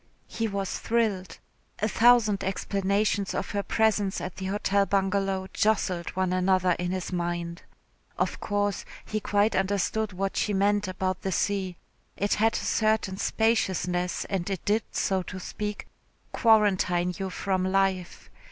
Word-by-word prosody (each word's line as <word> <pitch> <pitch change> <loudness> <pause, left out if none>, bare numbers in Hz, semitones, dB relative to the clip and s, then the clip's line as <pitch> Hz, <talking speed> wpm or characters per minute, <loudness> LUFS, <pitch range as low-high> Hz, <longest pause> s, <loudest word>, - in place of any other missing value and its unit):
He 225 - -2
was 200 -2 -3
thrilled. 215 -5 -1 0.4
A 215 - 0
thousand 225 -2 +4
explanations 200 +1 0
of - - -3
her 205 - 0
presence 210 -2 +1
at 180 - -6
the 190 - -4
Hotel 200 0 +1
Bungalow 195 -1 0
jostled 195 -5 +1
one 185 -1 0
another 185 0 +2
in 175 0 -1
his 185 0 -3
mind. 170 -1 -3 0.6
Of - - -1
course 205 -1 -1 0.2
he 215 - -2
quite 205 +1 +1
understood 200 +2 0
what 195 +1 -3
she 210 - 0
meant 205 +1 +2
about 185 0 -2
the 190 - -2
sea. 185 0 -1 0.4
It 205 +1 +1
had 225 +1 +2
a - - -2
certain 215 -3 +1
spaciousness 185 -6 0
and 190 -2 -2
it 190 -3 -4
did, 210 +2 +2
so 190 -1 0
to 185 +1 -7
speak, 210 +3 -5 0.5
quarantine 190 -6 +3
you 190 -1 -2
from 185 0 -1
life. 190 -1 -1
195 Hz, 145 wpm, -27 LUFS, 185-210 Hz, 0.6 s, thousand